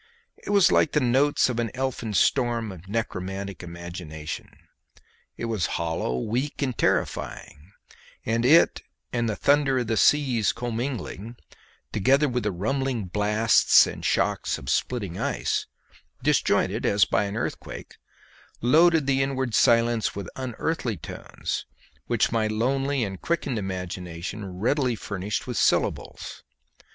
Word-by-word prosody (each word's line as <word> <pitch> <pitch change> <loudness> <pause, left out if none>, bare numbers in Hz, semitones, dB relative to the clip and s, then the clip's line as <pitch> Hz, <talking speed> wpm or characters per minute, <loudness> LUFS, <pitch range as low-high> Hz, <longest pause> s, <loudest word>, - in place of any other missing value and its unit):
It - - -8
was 200 -3 +5
like 155 - +3
the 150 - +4
notes 135 +3 +3
of 125 -2 -2
an 115 -1 0
elfin 125 -5 -3
storm 120 -4 +2
of 95 0 -12
necromantic 100 -2 -4
imagination; 85 -3 -7 0.9
it - - -4
was 110 -6 -1
hollow, 80 -6 -2
weak, 125 - -2
and 130 -3 -1
terrifying; 75 -4 -2 0.5
and 115 +1 0
it 155 +7 +5 0.3
and 120 -2 0
the 105 - -1
thunder 140 0 +3
of 125 - 0
the 115 -1 -1
seas 130 -7 +3
commingling, 120 -2 -4 0.6
together 135 +8 +3
with 125 -2 -1
the 105 -1 -1
rumbling 120 +4 -1
blasts 105 +3 +4
and - - -7
shocks - - 0
of 65 +1 -4
splitting 100 -2 -1
ice, - - -1 0.6
disjointed - - +2
as 100 -1 +4
by 105 - +1
an 100 +2 -4
earthquake, - - -5 0.6
loaded 160 +4 +4
the 135 0 +2
inward 130 -3 -1
silence 115 0 +3
with 100 -3 -5
unearthly 130 - -2
tones, 80 - -5 0.4
which - - +1
my 110 -2 +1
lonely 135 +5 0
and 95 -3 -5
quickened 145 -8 -1
imagination 90 0 -5
readily 120 +7 0
furnished 100 0 -4
with 125 -4 -4
syllables. - - 0
115 Hz, 130 wpm, -25 LUFS, 100-130 Hz, 0.9 s, was